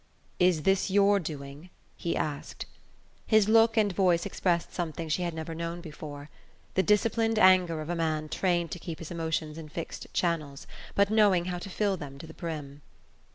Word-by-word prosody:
"Is 180 -4 +3
this 195 +3 +2
your 200 +1 +4
doing?" 145 0 -7 0.3
he 170 - -2
asked. 145 -2 -4 0.6
His 215 -2 +4
look 225 +1 +5
and 205 -3 +3
voice 180 -2 +2
expressed 175 -3 -1
something 165 -2 -3
she 160 +4 0
had 170 -2 -2
never 160 +1 -5
known 170 +1 -4
before: 150 -3 -9 0.4
the 190 - +3
disciplined 225 +2 +2
anger 185 -5 +5
of 155 - -7
a - - -1
man 155 -2 -1
trained 175 +1 0
to 175 - -5
keep 165 -1 -6
his 165 - -9
emotions 160 -2 -2
in 155 -2 -9
fixed 165 +2 -6
channels, 155 -5 -1 0.3
but 200 +1 +3
knowing 205 -5 +4
how 180 -1 -3
to 195 - -8
fill 200 0 0
them 140 -4 -8
to 150 - -9
the 160 - -11
brim. 150 -4 -6
170 Hz, 180 wpm, -28 LUFS, 155-195 Hz, 0.6 s, look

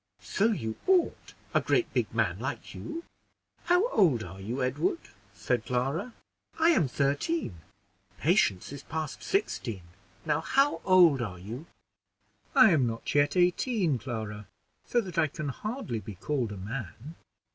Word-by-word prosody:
"So 200 - +1
you 115 - -2
ought, 370 -2 +2 0.2
a - - +4
great 360 - +1
big - - 0
man - - 0
like - - -5
you. 330 +1 -6 0.6
How 360 +6 +4
old 155 - +3
are 95 +2 -9
you, 120 +7 -2
Edward?" 130 0 0 0.4
said 120 +1 -1
Clara; 135 - -2 0.4
"I 325 +1 +4
am 180 - +4
thirteen; 140 - -1 0.6
Patience 145 - +2
is 140 - -7
past 155 -1 -5
sixteen: 120 - -1 0.4
now, 155 0 +1
how 275 - +2
old 175 -8 +6
are 95 -6 -4
you?" 115 - -8 0.9
"I 255 -6 +8
am 140 -7 +3
not 115 0 -4
yet 145 +4 +3
eighteen, 180 - +2
Clara, 110 -4 -5 0.4
so 240 - +2
that 180 -6 -3
I 160 - +4
can 155 0 -5
hardly 210 - -4
be 105 -2 -8
called 120 +3 -2
a 105 - -6
man." 115 - -6
145 Hz, 145 wpm, -29 LUFS, -, 0.9 s, I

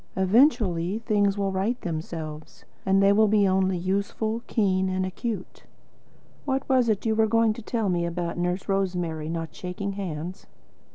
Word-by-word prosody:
Eventually 190 - +3
things 205 -3 +1
will 200 -1 0
right 200 +6 -1
themselves, 155 -3 -6 0.2
and 195 +1 +4
they 200 0 +6
will 215 +1 +4 0.2
only 190 -1 +2
be 170 - -6
usefully 205 +4 -1
keen 190 -4 +1
and 185 0 -1
acute. 190 +1 -5 0.8
What 270 -1 -1
was 255 -3 +3
it 210 0 0
you 220 - +2
were 220 0 +3
going 225 0 +3
to - - -9
tell 225 -1 -1
me 175 -2 0
about 170 0 -3
Nurse 180 +2 -1
Rosemary 180 -5 -1
not 165 -2 -4
shaking 185 +2 -4
hands?" 180 -2 -6
190 Hz, 160 wpm, -26 LUFS, 175-215 Hz, 0.8 s, they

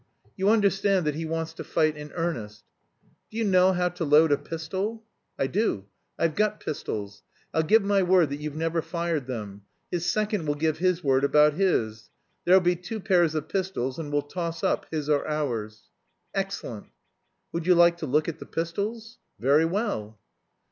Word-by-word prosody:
You 195 0 +1
understand 200 -4 +3
that 150 - +1
he 160 +2 -4
wants 165 0 -3
to - - -7
fight 155 -2 +1
in 150 0 -9
earnest. 120 - -3 0.7
Do 220 - -9
you 230 - +1
know 185 -2 +5
how 180 0 +1
to 175 0 -5
load 155 +1 +5
a 145 - +4
pistol?" 190 +8 -4 0.3
"I - - +1
do. 135 - 0 0.3
I've 165 -2 +1
got 210 +3 0
pistols. 105 -8 -5 0.3
I'll 160 - +3
give 210 +7 +4
my 200 0 +3
word 180 -5 +4
that 140 - -2
you've 150 -1 -5
never 165 +1 0
fired 170 -5 -2
them. 105 -5 -6 0.3
His 175 -1 -1
second 210 -6 0
will 145 - +1
give 155 +1 0
his 180 -1 +1
word 135 -1 +3
about 150 +1 +5
his. 115 - 0 0.4
There'll 185 +2 +6
be 175 0 +2
two 180 +6 -6
pairs 175 -5 +2
of 155 -1 -2
pistols, 170 -9 -2
and 150 -3 -5
we'll 145 0 +1
toss 170 +2 -5
up, - - 0
his 155 -3 -3
or 150 -2 +1
ours?" 115 -9 -3 0.4
"Excellent." 195 - -4 0.6
"Would 170 0 -3
you 180 - +6
like 170 0 +5
to 160 - -5
look 150 +4 +2
at 165 - -4
the - - -9
pistols?" 215 +8 -4 0.2
"Very 145 +6 +4
well." 165 - -2
165 Hz, 180 wpm, -26 LUFS, 145-185 Hz, 0.7 s, There'll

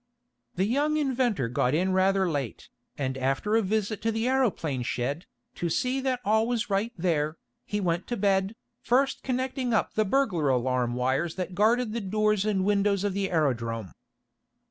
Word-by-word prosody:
The 185 - +1
young 290 +7 +1
inventor 250 - +1
got 125 +3 +1
in 185 +3 +1
rather 190 0 +3
late, 140 -8 -4 0.3
and 130 -2 -2
after 135 +11 0
a 225 - +4
visit 215 +1 -1
to 225 - +1
the 225 +2 -1
aeroplane 210 - 0
shed, 130 +6 -3 0.3
to 170 - -3
see 255 +10 0
that 260 -2 -1
all 220 +2 +3
was 235 -3 -1
right 200 +4 +1
there, 160 -3 0 0.3
he 210 - -2
went 175 -2 -1
to 240 - -2
bed, 195 +1 +1 0.3
first 270 +3 +1
connecting 255 -1 -1
up - - 0
the 215 - +2
burglar 190 - +1
alarm 125 -1 +1
wires 135 +6 0
that 185 0 -4
guarded 220 +3 +2
the 235 - -2
doors 210 +1 +1
and 195 -3 +1
windows 200 -1 +2
of 205 -2 0
the 195 0 -1
aerodrome. 115 - -1
195 Hz, 170 wpm, -27 LUFS, 155-225 Hz, 0.3 s, a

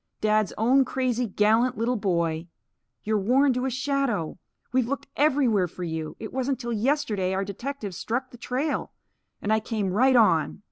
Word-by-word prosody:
"Dad's 215 -1 +2
own 255 +5 +4
crazy, 250 -2 -1
gallant 220 +5 +2
little 235 +3 0
boy! 170 -5 -1 0.6
You're 215 0 +1
worn 260 +7 +3
to 250 +1 -1
a - - +1
shadow! 260 - -1 0.3
We've 255 -2 +2
looked 280 +2 -3
everywhere 260 -10 +3
for 180 +2 -8
you. 160 -2 -4
It 220 - -7
wasn't 265 0 -1
till 240 -2 -3
yesterday 215 -6 0
our 195 +1 -1
detectives 205 -1 -5
struck 255 +3 -3
the 245 - -12
trail. 270 +5 -2 0.5
And 210 - +1
I 220 - +3
came 210 -4 -2
right 260 +5 +4
on." 190 -9 +3
230 Hz, 170 wpm, -26 LUFS, 200-260 Hz, 0.6 s, own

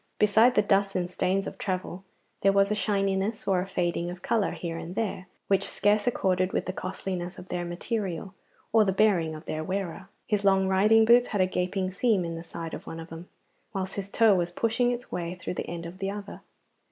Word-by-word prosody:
Beside 220 +4 +5
the 210 - +4
dust 200 -1 +2
and 180 -1 0
stains 190 +2 0
of - - -7
travel, 185 -1 -3 0.4
there 195 - +5
was 200 +1 +3
a - - +4
shininess 200 0 0
or 190 -2 +3
a 185 - -5
fading 175 -2 -1
of 180 +1 -8
colour 220 -3 +1
here 170 -2 -5
and 165 +2 -6
there 195 -4 -2 0.2
which 195 0 +1
scarce 205 +2 +2
accorded 185 -5 +1
with - - 0
the 185 - -3
costliness 185 -1 -4
of 185 - -11
their 175 - -2
material 180 +1 -3 0.4
or 220 -1 +6
the 195 - +1
bearing 185 -6 +2
of 155 - -10
their 155 0 -3
wearer. 190 +1 -4 0.2
His 210 -2 0
long 195 -1 +4
riding 210 +4 +5
boots 240 +2 +6
had 205 - 0
a - - +5
gaping 185 +1 -1
seam 200 -2 +1
in 165 - -4
the 165 - -5
side 165 -1 -7
of - - -7
one 165 - -6
of 165 +1 -9
them, 165 +2 -9 0.5
whilst 190 0 -2
his 200 -1 -4
toe 225 0 +5
was 175 -2 +1
pushing 230 +6 +1
its 245 0 -5
way 175 0 -3
through 180 - -5
the - - -4
end 170 -1 -5
of 175 +3 -9
the 195 - -1
other. 205 0 -7
190 Hz, 220 wpm, -27 LUFS, 180-205 Hz, 0.5 s, or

